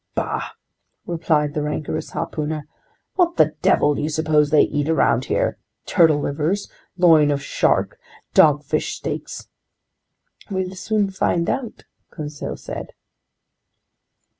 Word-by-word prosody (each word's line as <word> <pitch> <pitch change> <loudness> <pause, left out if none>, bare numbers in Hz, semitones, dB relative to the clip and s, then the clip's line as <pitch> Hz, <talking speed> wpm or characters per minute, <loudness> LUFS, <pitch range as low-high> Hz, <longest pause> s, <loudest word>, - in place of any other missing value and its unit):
"Bah!" - - -3 0.5
replied 155 -3 0
the 150 - -1
rancorous 150 +1 -3
harpooner. 150 -1 -4 0.5
"What 350 -2 +2
the - - +4
devil 150 - +3
do - - -3
you 150 - -1
suppose 155 -1 +2
they 155 -1 +5
eat 145 +1 -1
around 130 -5 +2
here? - - -1 0.3
Turtle 160 -3 +4
livers, 155 +8 -1 0.3
loin 160 -5 +5
of 140 -1 -1
shark, - - 0 0.3
dogfish 150 0 +3
steaks?" - - -6 1.0
"We'll 190 -1 -2
soon 205 +1 -1
find 170 -2 0
out!" 250 -5 -5 0.2
Conseil 150 -2 -6
said. - - -7
155 Hz, 115 wpm, -21 LUFS, 150-175 Hz, 1.0 s, they